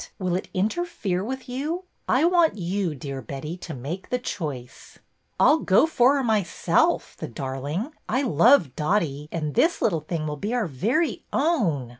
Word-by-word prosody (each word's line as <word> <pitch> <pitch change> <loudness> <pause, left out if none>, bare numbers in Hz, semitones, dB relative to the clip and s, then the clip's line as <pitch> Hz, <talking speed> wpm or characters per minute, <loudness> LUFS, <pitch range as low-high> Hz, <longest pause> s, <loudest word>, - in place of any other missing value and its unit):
Will 180 -2 -1
it 185 - -3
interfere 205 - -1
with 260 +4 -5
you? 295 +8 -3 0.3
I - - +3
want 345 -6 +3
you, 180 -2 -1
dear 135 -1 -6
Betty, 140 +5 -6
to 170 -4 -7
make 150 +9 -6
the 250 - +1
choice." 145 - -6 0.4
I - - +6
'll 315 - +3
go 195 +5 +4
for 275 -3 +4
her 275 - 0
myself, 215 -6 +1
the - - -6
darling. 140 - -4 0.2
I 260 +5 +1
love 175 - +4
Dotty, 150 -4 0
and 155 -3 -3
this 335 - +3
little 170 -8 +1
thing 155 0 -3
will 150 -1 -3
be 210 +10 -2
our 240 - +1
very 225 - 0
own." 210 - +1
185 Hz, 170 wpm, -25 LUFS, -, 0.4 s, I